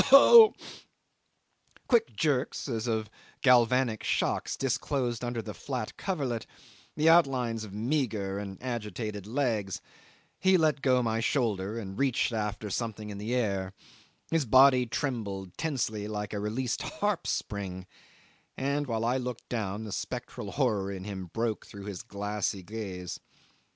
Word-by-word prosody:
Ough! - - +4
Ough!" 440 +10 +10 1.3
Quick 225 - +3
jerks 140 +1 0
as 115 -3 -2
of 110 -2 0 0.4
galvanic 125 -2 +4
shocks - - 0
disclosed 130 -2 -1
under 120 -2 -2
the 105 - -6
flat 125 -6 -4
coverlet 135 - -2 0.5
the 155 +1 +3
outlines 130 -9 +4
of 105 - -8
meagre 110 -4 -1
and 100 -2 -6
agitated 105 -4 -4
legs; 110 - -1 0.6
he 190 0 +5
let 155 -4 +2
go 130 -2 +3
my 115 -1 0
shoulder 110 -5 0
and 95 -3 -6
reached 130 -3 +1
after 105 -1 -3
something 110 -1 -3
in 100 - -7
the 110 +4 -2
air; 100 -6 -1 0.6
his 165 -4 +2
body 130 +1 +6
trembled 100 -8 -3
tensely 120 -9 -2
like 105 -1 -4
a 105 - -2
released 115 +4 -2
harp 210 - -1
string; 95 -3 -3 0.7
and 140 +2 0
while 115 -1 -1
I 125 +2 +2
looked 125 -2 -5
down, 105 -3 -2
the 110 - -6
spectral 120 -3 -5
horror 105 -8 +1
in 95 -1 -6
him 95 -2 -6
broke 115 +4 -2
through 100 -1 -10
his 100 -3 -5
glassy 105 -3 -3
gaze. 95 -4 -6
115 Hz, 140 wpm, -29 LUFS, 105-130 Hz, 1.3 s, Ough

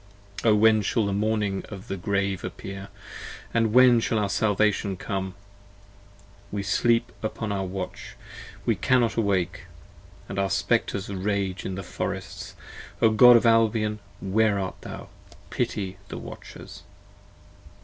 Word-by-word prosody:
O 110 -2 +5
when 110 0 +5
shall 105 +2 +1
the 100 - -1
morning 105 -1 0
of 100 +1 -9
the 95 - -3
grave 100 0 -1
appear, 95 0 -7 0.7
and 115 -2 +2
when 125 0 +7
Shall 115 - 0
our 105 -2 0
salvation 105 -2 +1
come? 95 -1 -4 1.2
we 100 -1 -3
sleep 115 +4 +2
upon 110 0 -3
our 95 -1 -1
watch, 95 0 -6 0.5
We - - +3
cannot 125 -3 +2
awake; 95 -6 0 0.6
and 100 - -4
our 100 0 +1
Spectres 100 0 0
rage 100 -1 -2
in 95 - -3
the 95 - -5
forests, - - -5 0.4
O 110 - +5
God 125 +3 +8
of 115 - 0
Albion 110 -2 +3 0.2
where 105 +1 +2
art 95 -1 -4
thou; - - -8 0.4
pity 95 -2 -2
the - - -7
watchers! - - -10
100 Hz, 135 wpm, -26 LUFS, 95-110 Hz, 1.2 s, God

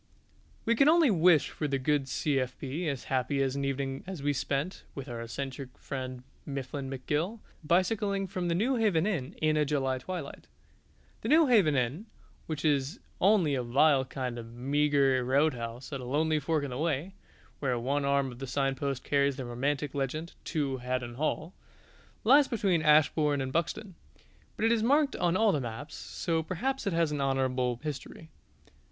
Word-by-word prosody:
We 230 - +3
can 275 +5 +5
only 325 -5 +5
wish 170 -4 +4
for 150 - -3
the 140 -1 0
good 135 +1 0
C.F.B. 135 +3 -2
as 140 -3 -4
happy 135 +1 0
an 135 +1 -1
evening 135 0 -2
as 185 -7 -6
we 145 0 +2
spent 140 +6 -2
(with 135 -1 -6
our 120 -2 -5
eccentric 130 +2 -6
friend 130 -2 -6 0.2
Mifflin 135 0 -5
McGill) 150 - -2 0.3
bicycling 195 +4 +1
from 185 -1 -3
the 170 - +1
Newhaven 215 -5 +2
Inn 170 -12 -2
in 155 0 +3
a 150 - +3
July 135 -3 0
twilight. 170 -1 -7 0.7
The - - -3
Newhaven 245 - +5
Inn, 135 - -1 0.4
which 155 -1 -4
is 145 - +1 0.2
only 190 -7 +4
a 130 - 0
vile 135 +3 +4
kind 130 -2 -4
of 115 0 -10
meagre 140 0 +2
roadhouse 125 -2 0
at 135 - -4
a - - -7
lonely 155 +4 +1
fork 155 0 0
in 140 - -4
the 125 - -4
way 160 +3 -1 0.5
(where 130 -4 0
one 140 +4 -1
arm 140 -1 +1
of 120 - -12
the 135 - -5
signpost 135 0 -1
carries 140 -1 +2
the 130 -2 -5
romantic 140 +4 -2
legend 150 +4 -3
"To 140 -4 -1
Haddon 125 -1 -3
Hall"), 155 +5 -2 0.7
lies 275 +5 +6
between 195 -8 +1
Ashbourne 150 -1 +4
and 130 0 -3
Buxton. 175 +4 -2 0.6
But 220 - -1
it 225 - +4
is 230 -2 +2
marked 285 +5 +3
on 175 0 +1
all 220 -1 +4
the 150 - 0
maps, 125 +5 -6
so 165 -2 -2
perhaps 225 +10 -2
it 195 - 0
has 165 -2 +2
an 145 -1 -2
honourable 130 -3 0
history. 155 +2 -7
145 Hz, 170 wpm, -29 LUFS, 130-170 Hz, 0.7 s, lies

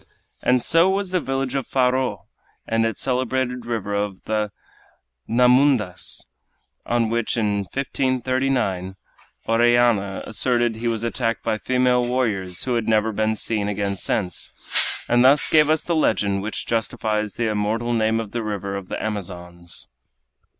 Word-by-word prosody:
And 125 -1 +2
so 170 +3 +5
was 195 -1 -1
the 185 - +2
village 135 -3 -2
of 135 -2 -2
Faro 130 0 0 0.4
and 115 0 +1
its 115 - -5
celebrated 125 -1 -1
river 110 -4 -2
of 100 -2 -2
the 105 -1 -1 0.8
Nhamundas, 125 - +2 0.6
on 115 -2 +1
which, 115 0 -1
in 105 -2 +1
1539, 130 -8 -1 0.5
Orellana 115 -4 +3
asserted 120 -1 0
he 120 +1 -3
was 115 -1 -1
attacked 115 -1 -1
by 110 -1 -1
female 125 0 +2
warriors, 110 -8 -1
who 125 - -1
have 115 -2 -1
never 110 0 +2
been 110 +1 0
seen 105 -2 -1
again 100 -1 -1
since, 95 -2 -2 0.6
and 120 +1 +4
thus 140 +3 +5
gave 155 -1 +4
us 155 0 +2
the 170 - -1
legend 100 -10 +1
which 105 +2 -4
justifies 110 -2 -1
the 120 - -1
immortal 110 +3 -1
name 110 0 +2
of 110 -3 -5
the 120 - -2
river 100 -2 -3
of 100 -2 -6
the - - -3
Amazons. 90 -4 -5
115 Hz, 145 wpm, -22 LUFS, 105-125 Hz, 0.8 s, so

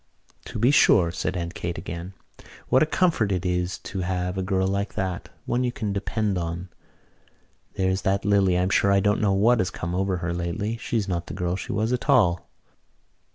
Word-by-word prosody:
"To - - -6
be 120 +5 +4
sure," 90 -11 +5
said 90 +1 -3
Aunt 85 0 -4
Kate 85 -2 -4
again. 85 +2 -7 0.5
"What 130 - +4
a 155 - +4
comfort 160 - +1
it 90 -1 -1
is 90 0 -1
to 95 - -6
have 90 0 -2
a 95 - -1
girl 95 0 0
like 100 +1 -2
that, 95 -3 -3 0.2
one 125 +1 0
you 125 - 0
can 105 -4 -3
depend 100 -1 -1
on! 85 +2 -4 1.1
There's 95 0 0
that 95 +1 0
Lily, 100 -3 +3
I'm 90 +1 +1
sure 100 - +3
I 100 - +4
don't 105 +2 +1
know 100 -2 +2
what 115 +5 +4
has 95 - +1
come 85 +1 -5
over 95 0 0
her 85 0 -3
lately. 90 +6 -2
She's 110 -2 -2
not 85 -2 -2
the - - -6
girl 90 -1 -1
she - - -5
was 110 +3 0
at 120 -3 -3
all." 90 -7 +3
95 Hz, 200 wpm, -25 LUFS, 90-105 Hz, 1.1 s, sure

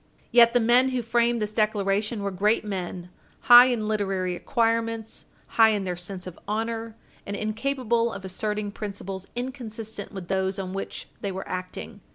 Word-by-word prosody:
Yet 235 -1 +7
the 245 - +5
men 245 +3 +4
who 255 -2 -1
framed 235 +1 +2
this 210 0 -4
declaration 210 0 0
were 200 - -1
great 210 +4 +1
men 180 -3 -5 0.3
high 245 +1 +9
in 230 -4 -1
literary 195 -4 -1
acquirements, 230 +1 -1 0.2
high 225 -1 +5
in 205 -2 -1
their 180 -1 -2
sense 180 +1 -6
of 185 -2 -9
honor, 225 +1 -3 0.3
and 200 - -5
incapable 235 +2 0
of 195 -3 -7
asserting 210 +2 -3
principles 195 -2 -6
inconsistent 225 -4 -6
with 190 -4 -7
those 190 0 0
on 190 -1 -4
which 195 - -5
they 200 - -2
were 190 +1 -6
acting. 185 +3 -6
215 Hz, 165 wpm, -26 LUFS, 195-230 Hz, 0.3 s, high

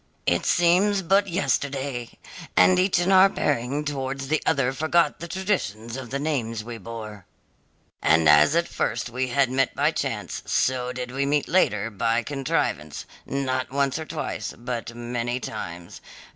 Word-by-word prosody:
It - - +1
seems 185 +3 +3
but 195 +3 +3
yesterday! 140 -6 -2 0.4
and 185 -1 +6
each 185 0 +3
in 175 +2 +2
our 190 +1 +7
bearing 145 -2 -1
towards 135 -1 -3
the 155 0 +1
other 135 -1 +2
forgot 160 +2 +1
the 170 - -6
traditions 160 - -2
of 130 -2 -7
the 135 - -2
names 120 -7 -2
we 115 0 -7
bore. 105 -3 -8 0.7
And 80 0 +4
as 75 - +6
at 170 0 +2
first 120 - -2
we 130 +2 -1
had 130 0 +1
met 135 0 +1
by - - +2
chance, - - -3
so 125 -1 +1
did 125 -1 -5
we 135 +2 -1
meet 145 0 +1
later 115 - +2
by 115 +3 0
contrivance, 115 - -2 0.2
not 130 -1 -1
once 140 +2 0
or 160 - -5
twice, - - -4
but 120 -1 -5
many 120 +1 -3
times. 85 -8 -7
130 Hz, 160 wpm, -24 LUFS, 115-155 Hz, 0.7 s, our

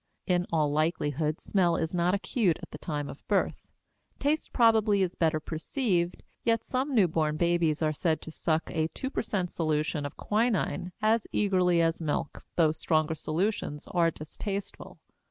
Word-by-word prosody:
In 180 -1 +1
all 155 -3 +2
likelihood, 155 0 0
smell 175 -4 +2
is 160 +1 -2
not 180 +2 +2
acute 200 -3 +1
at - - -9
the 150 - -8
time 145 -3 -3
of 140 - -9
birth. 205 - 0 0.5
Taste 300 +3 0
probably 220 -4 +4
is 180 -1 -1
better 160 -2 +1
perceived, 175 - -1 0.2
yet 230 -1 +2
some 265 +2 -1
newborn 160 -7 +2
babies 170 -2 +2
are 155 0 +2
said 160 +1 0
to 160 - -7
suck 160 0 -1
a 160 -1 0
two 265 - -3
per - - -1
cent 190 -6 -2
solution 155 -1 0
of 145 - -6
quinin 210 -4 0
as 220 +1 +3
eagerly 180 -4 +3
as 165 +1 0
milk, 150 -2 -2
though 160 -3 +4
stronger 155 0 +1
solutions 160 -1 -2
are 170 -2 +3
distasteful. 195 +6 -6
170 Hz, 160 wpm, -29 LUFS, 155-200 Hz, 0.5 s, probably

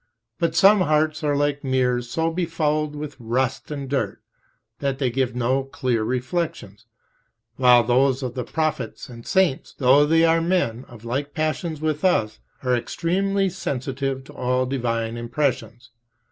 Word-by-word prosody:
But 165 -2 0
some 195 +3 +6
hearts 155 -1 +1
are 145 -1 +1
like 145 0 0
mirrors 125 -2 0
so 160 +6 0
befouled 155 -3 -1
with 150 -1 -6
rust 120 +2 -1
and 140 -2 -5
dirt 135 0 -2 0.6
that 140 -2 -1
they 130 -3 0
give 125 -1 -1
no 130 +2 +1
clear 125 -4 -1
reflections, 125 - -3 0.7
while 125 -2 +6
those 130 +3 +2
of 125 -2 -3
the 125 - -3
prophets 155 +2 -3
and 115 -1 -11
saints, 185 -8 +1
though 140 +2 +5
they 165 +1 +4
are 165 0 +3
men 165 -9 0
"of 120 -2 -13
like 140 +6 -3
passions 155 0 -2
with 155 -1 -1
us," 110 - +1 0.2
are 125 -1 +2
extremely 195 +9 0
sensitive 135 -5 -3
to - - -14
all 125 +1 0
divine 115 -3 -2
impressions. 120 -2 -2
135 Hz, 150 wpm, -23 LUFS, 125-155 Hz, 0.7 s, some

